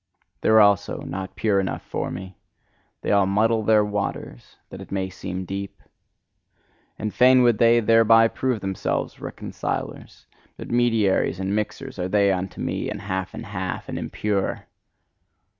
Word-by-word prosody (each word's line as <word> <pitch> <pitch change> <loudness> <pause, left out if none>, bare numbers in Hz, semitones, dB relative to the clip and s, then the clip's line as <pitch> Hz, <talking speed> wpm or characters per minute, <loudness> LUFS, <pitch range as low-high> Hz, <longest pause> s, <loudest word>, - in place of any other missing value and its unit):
They - - +1
are 110 0 +7
also 100 -2 +3
not 95 0 -6
pure 105 -3 +1
enough 95 - -3
for - - -4
me: 95 +1 -7 0.7
they - - -1
all 100 -2 +4
muddle 110 +3 +2
their 105 -1 +4
water 105 -11 -4 0.3
that - - -8
it - - -12
may 95 -1 -2
seem 95 0 -6
deep. 100 +2 -6 1.2
And 105 -1 -4
fain 125 0 +6
would 120 -3 +3
they 115 0 +5
thereby 115 0 +5
prove 125 -4 -2
themselves 95 -1 -3
reconcilers: - - -6 0.3
but - - -8
mediaries 115 -7 +2
and 95 +1 -1
mixers 105 -2 -4
are 90 0 -2
they 100 0 +3
unto 95 0 -3
me, - - -2
and 105 - -5
half 95 -2 -4
and - - -7
half, 95 -2 -5
and - - -4
impure! 105 -2 -2
100 Hz, 155 wpm, -23 LUFS, 95-110 Hz, 1.2 s, are